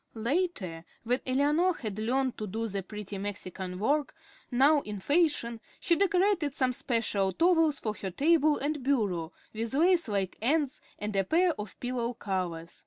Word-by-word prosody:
Later, 225 - -2 0.2
when 245 +2 +1
Eleanor 295 +7 +2
had 215 -3 -5
learned 255 +3 0
to 215 - -3
do 225 +4 -3
the 200 -2 -3
pretty 205 0 -7
Mexican 190 -2 -5
work, 285 +8 0 0.3
now 280 +4 +5
in 210 -6 -6
fashion, 285 - +1 0.2
she 345 -4 +2
decorated 370 -5 +2
some 255 -3 +1
special 220 -6 0
towels 325 -4 +3
for 215 - -2
her 195 -2 -5
table 300 - +3
and 295 +1 -2
bureau, 205 -11 0 0.2
with 225 +3 -3
lace 345 0 +3
like 195 -3 -2
ends, 290 +3 +1 0.2
and 210 0 -4
a 195 - +3
pair 345 - +3
of 210 -8 -8
pillow 245 -1 -2
covers. 175 -5 -4
245 Hz, 160 wpm, -29 LUFS, 205-300 Hz, 0.3 s, now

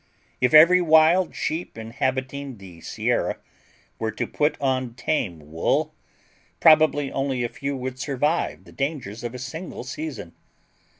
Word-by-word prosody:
If 125 - +3
every 175 +4 +8
wild 165 +2 +4
sheep 160 -6 -3
inhabiting 130 +3 -3
the 90 -4 -13
Sierra - - -1 0.6
were 110 - -1
to 105 - -3
put 150 +1 0
on 130 -3 -1
tame 90 - -3
wool, 80 +1 0 0.7
probably 155 -3 +5
only 135 -2 -1
a 120 - -1
few 140 +3 -4
would 130 0 -5
survive 145 +5 -1
the - - -16
dangers 135 -7 -4
of 120 +1 -5
a - - -4
single 135 +5 -7
season. 130 - -6
130 Hz, 135 wpm, -24 LUFS, 120-155 Hz, 0.7 s, every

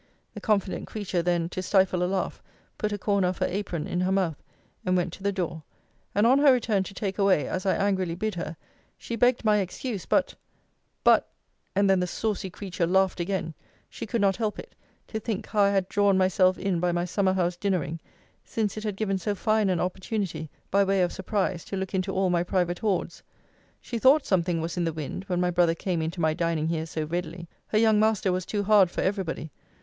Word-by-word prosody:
The - - -8
confident 200 -4 0
creature 195 -5 -2
then, 170 -1 +1
to 185 - -4
stifle 185 -1 +2
a - - +3
laugh, 190 -1 -2 0.4
put 210 - -1
a 205 - -2
corner 200 -2 +1
of 180 - -2
her - - +1
apron 180 -4 -3
in 175 - -2
her 185 +1 +1
mouth, 185 -6 0 0.4
and 185 0 +2
went 175 -1 -1
to - - -10
the 200 +1 +1
door: 175 -4 -3 0.5
and 205 +2 +4
on 260 +4 +5
her 285 -1 +7
return 225 -5 +2
to 195 - -9
take 195 0 -3
away, 195 -6 +3
as 185 +1 -3
I 190 - +3
angrily 190 -4 0
bid 215 +4 -2
her, 170 -2 -5 0.4
she 235 - -5
begged 245 +1 +2
my 210 -1 +5
excuse 200 +1 -3
but 280 - +2 0.7
but - - +5 0.5
and 200 +1 +3
then 190 -1 +4
the 180 - 0
saucy 205 0 -2
creature 180 -2 -3
laughed 190 +1 +2
again, 175 -2 -2 0.4
she - - -6
could 230 +1 -1
not 195 -1 +3
help 215 -3 -1
it, - - -10 0.4
to 220 - -3
think 220 -2 -3
how 210 - 0
I 200 - +5
had 195 -2 +1
drawn 200 -1 +3
myself 185 0 +3
in 190 -3 -1
by 175 +1 +1
my 175 0 0
summer 190 +1 +1
house 180 -2 0
dinnering, 175 -4 -1 0.4
since 215 -2 -2
it 215 - -4
had 210 -3 -3
given 195 -3 0
so 205 +3 -2
fine 215 0 +1
an 180 -3 +1
opportunity, 185 -2 -3 0.2
by 200 +1 +4
way 195 -1 +2
of 175 - -1
surprise, 190 -3 -1
to 195 - -4
look 190 +1 -4
into 190 0 0
all 190 -1 +1
my 175 -1 +2
private 175 0 0
hoards. 195 -5 -1 0.6
She 235 - -5
thought 270 +5 +5
something 175 -3 +1
was 165 +2 -4
in 175 - +1
the 165 - -1
wind, 160 +5 -5
when 180 -3 -1
my 180 0 +1
brother 170 -1 +3
came 175 -1 -2
into 165 +3 -3
my 160 -1 +2
dining 165 -1 0
here 160 -1 -2
so 155 -1 -3
readily. 170 +1 -4 0.2
Her 215 - 0
young 220 -1 +4
master 215 -3 +2
was 180 0 -2
too 205 -1 -1
hard 200 -3 +5
for - - -3
every 195 +1 0
body. 160 -2 -5
190 Hz, 220 wpm, -26 LUFS, 175-205 Hz, 0.7 s, her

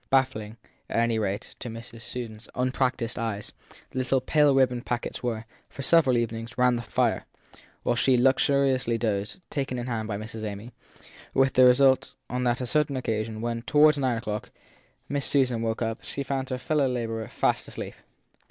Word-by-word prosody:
Baffling, 115 -5 +1 0.3
at - - -2
any 115 -1 +2
rate, 100 -1 -3
to 120 - -5
Miss 115 +1 -8
Susan 115 -2 -6
s 110 - -14
unpractised 125 -2 0
eyes, 110 -3 -3 0.4
the 130 - -3
little 130 +1 +2
pale 145 +2 +3
ribboned 125 -2 +3
packets 120 0 -3
were, 115 -2 -2 0.2
for 135 - -7
several 135 -4 +5
even 115 -1 -1
ings, 115 +1 -9
round 125 -1 +3
the - - -3
fire, - - 0 0.6
while 120 - +1
she 125 +1 +3
luxuriously 130 -1 +3
dozed, 110 - -2
taken 135 -3 -2
in 120 - -3
hand 115 -3 -2
by 105 -2 -2
Miss 110 +2 -7
Amy; 110 +1 -6 0.6
with 135 -1 +4
the 130 - +7
result 130 +1 +4
that - - -8
on 125 0 0
a 120 +1 0
certain 145 +1 +1
occasion 110 -2 -2
when, 115 0 -2
toward 150 +4 +5
nine 130 -4 0
o - - -4
clock, 105 -2 -4 0.6
Miss 140 -1 -1
Susan 125 -5 +2
woke 115 +1 -1
up, 115 0 -3
she 140 - -4
found 135 -1 -2
her 130 - -1
fellow 140 +2 +1
labourer 115 -3 -2
fast - - 0
asleep. - - -6
125 Hz, 185 wpm, -27 LUFS, 115-130 Hz, 0.6 s, the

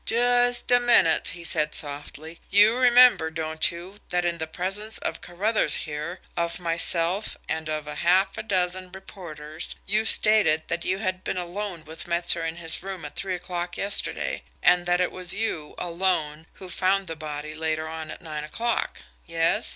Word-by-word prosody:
"Just 245 +1 +2
a 245 - +6
minute," 235 -9 +3
he 175 -2 -7
said 150 -2 +3
softly. 150 +2 -1
"You 205 +3 +6
remember, 245 -8 +6
don't 160 0 0
you, 175 +4 -9
that 180 0 0
in 170 -1 -1
the 160 - -3
presence 195 +6 -3
of - - -4
Carruthers 205 +6 +1
here, 155 +4 -6
of 170 0 -2
myself, 170 +3 0
and 160 -1 -3
of 155 -1 -3
half 180 +6 +2
a - - -4
dozen 185 -3 -1
reporters, 165 -5 -8
you 215 +3 +2
stated 210 -9 +4
that 170 0 -2
you 185 - 0
had 185 -2 -3
been - - -3
alone 180 -1 -5
with 160 +2 -8
Metzer 170 -1 +1
in 165 0 -3
his 165 -2 -2
room 190 -1 -7
at - - -9
three 190 -1 -3
o'clock 175 0 -5
yesterday, 200 0 0 0.2
and 175 0 +4
that 175 0 +2
it 180 - 0
was 180 -1 0
you 170 -9 -3
alone 170 -3 -2
who 190 - -11
found 190 +2 +1
the 165 - -5
body 155 -1 -6
later 155 0 -2
on 160 -1 -7
at - - -9
nine 155 -2 -5
o'clock? 230 +10 -2 0.2
Yes? 165 0 +2
175 Hz, 175 wpm, -25 LUFS, 160-195 Hz, 0.2 s, a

